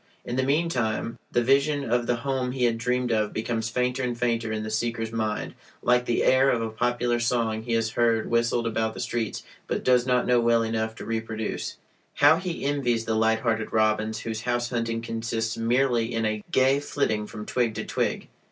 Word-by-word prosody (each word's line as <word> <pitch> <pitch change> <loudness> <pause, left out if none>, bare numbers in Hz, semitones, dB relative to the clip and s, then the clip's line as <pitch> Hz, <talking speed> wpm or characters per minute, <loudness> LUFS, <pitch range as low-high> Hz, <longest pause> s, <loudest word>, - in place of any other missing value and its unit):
In 120 - -3
the 130 - +2
meantime, 130 -6 0
the 120 - +2
vision 140 +2 +2
of 120 +1 +1
the 120 - +2
home 130 0 -2
he 130 -2 -1
had 115 -1 +2
dreamed 125 +1 0
of 110 -2 +1
becomes 115 0 -2
fainter 125 +2 0
and 120 -2 -2
fainter 115 -2 0
in 110 0 -2
the 110 - -5
seeker's 115 0 -2
mind 110 -2 -2 0.3
like 125 0 +3
the 120 - +1
air 130 +1 +5
of 120 - +2
a 115 -1 -3
popular 120 +1 0
song 115 -2 0
he 115 +1 -3
has 115 -1 +1
heard 115 -1 +2
whistled 115 0 +1
about 110 -1 -1
the - - -7
streets, 120 -2 -3 0.2
but - - -2
does 125 0 +3
not 125 -1 +2
know 125 -1 +4
well 115 -1 +3
enough 110 0 -2
to - - -8
reproduce. 110 -1 -3 0.4
How 160 - +6
he 180 -4 -4
envies 125 -5 0
the 110 - 0
light 110 0 +2
hearted 110 -2 -1
robins, 110 0 +1
whose 110 -1 -4
house 120 0 -1
hunting 115 -1 -2
consists 115 0 -2
merely 120 0 +1
in 115 -1 0
a 110 -1 -1
gay 130 +1 +3
flitting 110 -7 -1
from 105 0 -8
twig 120 -3 0
to - - -4
twig. - - -2
115 Hz, 200 wpm, -26 LUFS, 110-125 Hz, 0.4 s, How